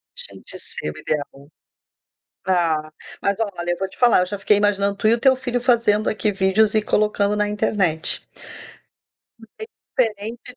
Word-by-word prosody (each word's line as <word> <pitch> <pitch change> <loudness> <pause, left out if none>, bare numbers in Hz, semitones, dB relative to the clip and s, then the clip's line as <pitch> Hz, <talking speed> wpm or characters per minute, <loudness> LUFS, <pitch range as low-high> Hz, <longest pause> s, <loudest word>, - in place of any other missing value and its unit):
Gente, - - -6
ia - - -6
ser 75 - -2
o - - -14
ideal. 145 -1 -5 1.0
Ah, 160 -4 0 0.3
mas, 200 0 +1
olha, 185 -6 -3
eu 175 - -2
vou 195 - -3
te - - -13
falar, 245 -5 +5
eu - - +1
já 200 +3 -5
fiquei 205 +1 +3
imaginando 200 -1 +1
tu 215 - 0
e 220 - +6
o 235 - +1
teu 260 +2 +4
filho 245 -2 -3
fazendo 230 -4 +2
aqui 215 0 -1
vídeos 200 +2 +2
e 215 - +3
colocando 210 -1 +1
na 210 0 +1
internet. 190 -6 0 1.2
Bem 225 -1 -16 0.5
diferente 230 +2 -2
205 Hz, 170 wpm, -21 LUFS, 190-225 Hz, 1.2 s, e